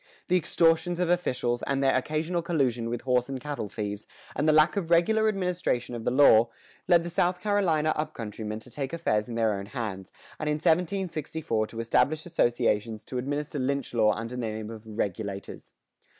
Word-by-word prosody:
The 180 - +4
extortions 170 0 +2
of 175 -1 +1
officials, 125 -8 0
and 140 0 -1
their 135 - +3
occasional 155 +6 -1
collusion 130 -9 0
with 120 0 -3
horse 125 0 +1
and 135 -1 -4
cattle 140 -6 -4
thieves, 105 -1 -5 0.3
and 155 - +2
the - - +7
lack 155 +4 +5
of 185 -5 -2
regular 220 +6 +4
administration 180 - -1
of 115 -2 -6
the - - +3
law, 120 -3 +6 0.4
led 175 -2 +5
the 170 - -4
South 180 +1 +1
Carolina 180 -6 +1
up 155 - -3
country 110 -1 -6
men 105 0 -3
to 125 - -14
take 135 +2 -4
affairs 105 -10 0
in 115 - -5
their 110 -2 +2
own 100 0 -5
hands, 105 -6 -5 0.3
and 155 - -1
in 150 - +2
1764 160 - 0
to 115 - -8
establish 145 +7 +1
associations 115 -8 0
to 125 - -4
administer 145 +3 -3
lynch 140 0 -1
law 110 -2 +4
under 115 +2 -5
the 125 - -3
name 110 -1 -4
of 110 -1 -8
"Regulators." 100 -2 -4
135 Hz, 190 wpm, -27 LUFS, 115-165 Hz, 0.4 s, the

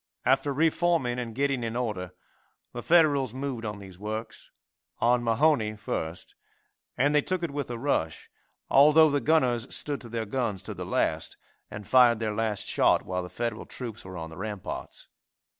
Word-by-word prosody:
After 135 +2 +2
reforming 160 -4 +1
and 115 -2 -5
getting 135 -2 0
in 115 0 -3
order, 105 -7 -3 0.6
the 120 - -5
Federals 145 -6 +3
moved 130 -3 -4
on 105 -1 -4
these 95 -2 -12
works 110 +2 -6 0.5
on 120 +1 +2
Mahone 115 -2 +2
first, 80 -4 -5 0.6
and 145 +4 +3
they 150 - +4
took 185 +3 -2
it 170 - -2
with 140 -2 -4
a 120 - -4
rush, 115 - -1 0.4
although 150 +3 +6
the 145 -1 +1
gunners 125 -5 +2
stood 145 -2 -3
to 120 - -10
their 115 -1 -3
guns 105 -4 -2
to - - -5
the - - -7
last - - -1 0.3
and 105 -1 -8
fired 125 -3 +6
their 110 -1 -2
last 105 -2 -2
shot - - +3
while 90 0 -2
the 90 - -7
Federal 115 +4 -4
troops 115 -4 -7
were 95 -1 -8
on 80 -1 -6
the 80 - -11
ramparts. 105 -1 -6
120 Hz, 175 wpm, -27 LUFS, 105-140 Hz, 0.6 s, although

